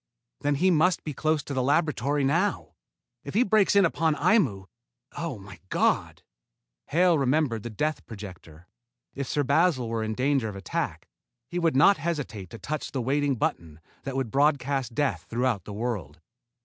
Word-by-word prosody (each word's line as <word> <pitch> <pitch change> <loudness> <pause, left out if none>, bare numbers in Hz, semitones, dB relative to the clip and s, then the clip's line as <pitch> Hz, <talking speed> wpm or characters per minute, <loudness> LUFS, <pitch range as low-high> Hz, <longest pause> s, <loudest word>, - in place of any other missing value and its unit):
"Then 145 0 0
he 185 +6 +3
must 175 +2 +3
be 150 - -4
close 155 +1 0
to 140 - -6
the 130 - 0
laboratory 145 0 +1
now. 170 +9 0 0.5
If - - -8
he 235 - +5
breaks 210 -2 +3
in 200 -2 +6
upon 160 -1 +1
Aimu 145 - +2 0.5
oh, 165 -7 -4
my 95 -3 -12
God!" - - 0 0.6
Hale 170 0 +3
remembered 135 -4 +1
the 120 - -6
death 150 +8 -2
projector. 90 -6 -10 0.5
If 140 -1 -4
Sir 145 - 0
Basil 140 -2 +2
were 115 -1 -1
in 110 0 -3
danger 130 -2 +1
of 100 - -8
attack, 95 -3 -4 0.4
he 175 +5 -3
would 165 -4 +1
not 155 +9 +6
hesitate 145 - -4
to 115 - -9
touch 150 +6 -4
the 135 - -1
waiting 140 +3 +1
button 80 -8 -3 0.2
that 135 -1 -5
would 130 -5 -2
broadcast 135 -3 +1
death 145 0 -1
throughout 120 -5 0
the - - -8
world. 105 -8 -4
140 Hz, 170 wpm, -26 LUFS, 115-155 Hz, 0.6 s, in